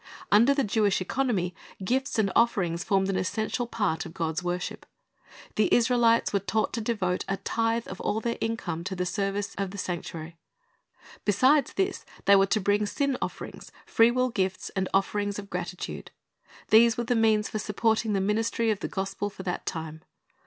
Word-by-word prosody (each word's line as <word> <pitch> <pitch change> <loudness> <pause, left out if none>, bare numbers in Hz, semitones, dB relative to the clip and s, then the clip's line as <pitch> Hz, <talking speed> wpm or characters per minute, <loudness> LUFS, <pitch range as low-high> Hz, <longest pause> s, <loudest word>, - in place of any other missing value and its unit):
Under 235 +7 +6
the 275 - +2
Jewish 210 -2 +2
economy, 190 -3 -1 0.3
gifts 260 +6 0
and 200 -3 +2
offerings 180 -7 +2
formed 195 -1 +2
an 195 -1 0
essential 220 +5 -1
part 205 -8 -1
of 160 - -10
God's 160 0 -1
worship. 180 0 -4 0.7
The 215 - +3
Israelites 235 -2 +3
were 200 - +3
taught 215 +3 -1
to 230 - -2
devote 200 -5 -1
a 195 - -1
tithe 230 +2 -1
of - - -7
all 215 - 0
their 235 +1 -3
income 180 -8 -2
to 190 0 -3
the 180 0 -1
service 195 +2 -2
of 195 -1 -1
the 200 - -8
sanctuary. 170 -3 -5 0.9
Besides 260 +7 +3
this 390 0 -1 0.2
they 200 - +7
were 195 0 +5
to 215 - +2
bring 205 +1 +1
sin 280 +4 0
offerings, - - -6
free 230 +1 +5
will 255 +1 +1
gifts, 190 -5 -2
and 190 -1 -2
offerings 205 +1 0
of 200 -1 -8
gratitude. 180 0 -5 0.6
These 230 +1 +6
were 240 - 0
the 240 +1 0
means 220 -2 +3
for 215 - -3
supporting 220 +1 0
the 195 - +1
ministry 225 +3 +1
of 205 - -2
the - - -3
gospel 195 +1 -3
for 195 -1 -10
that 180 -1 -4
time. 160 -2 -5
205 Hz, 180 wpm, -27 LUFS, 190-230 Hz, 0.9 s, they